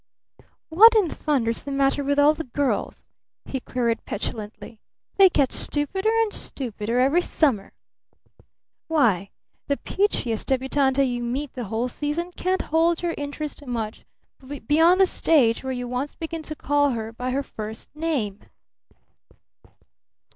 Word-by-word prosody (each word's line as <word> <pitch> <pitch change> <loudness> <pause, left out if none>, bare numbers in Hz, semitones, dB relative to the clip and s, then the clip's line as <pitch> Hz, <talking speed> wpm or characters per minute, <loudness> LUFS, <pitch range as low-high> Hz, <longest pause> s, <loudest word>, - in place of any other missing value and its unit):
What 440 +8 +8
in 400 -7 +3
thunder's 240 -7 -1
the 285 - -7
matter 275 +1 +1
with 285 +1 0
all 290 +1 +6
the 320 - -5
girls?" 275 +2 -2 0.4
he 265 - -4
queried 235 -2 -2
petulantly. 215 +1 -6 0.4
"They 390 -1 +8
get 280 -6 +1
stupider 380 +9 0
and 425 - -4
stupider 235 -2 -2
every 275 +7 +3
summer! 265 - 0 1.2
Why, 220 - +2 0.4
the 280 - 0
peachiest 250 - -1
débutante 265 +1 +2
you 245 -1 -3
meet 255 +4 -3
the 245 -2 -5
whole 225 +4 -2
season 295 +7 -3
can't 370 +1 -1
hold 330 +2 +1
your 340 -1 0
interest 290 +1 -6
much 225 -3 -4 0.6
beyond 330 +5 +4
the 385 - +7
stage 270 -11 +2
where 265 - -3
you 245 -1 -4
once 250 +4 -3
begin 325 0 -5
to 310 - -4
call 290 -1 +1
her 220 0 -5
by 250 +2 -4
her 275 +2 -1
first 220 +2 -9
name!" 275 -11 -2
275 Hz, 140 wpm, -24 LUFS, 240-320 Hz, 1.2 s, What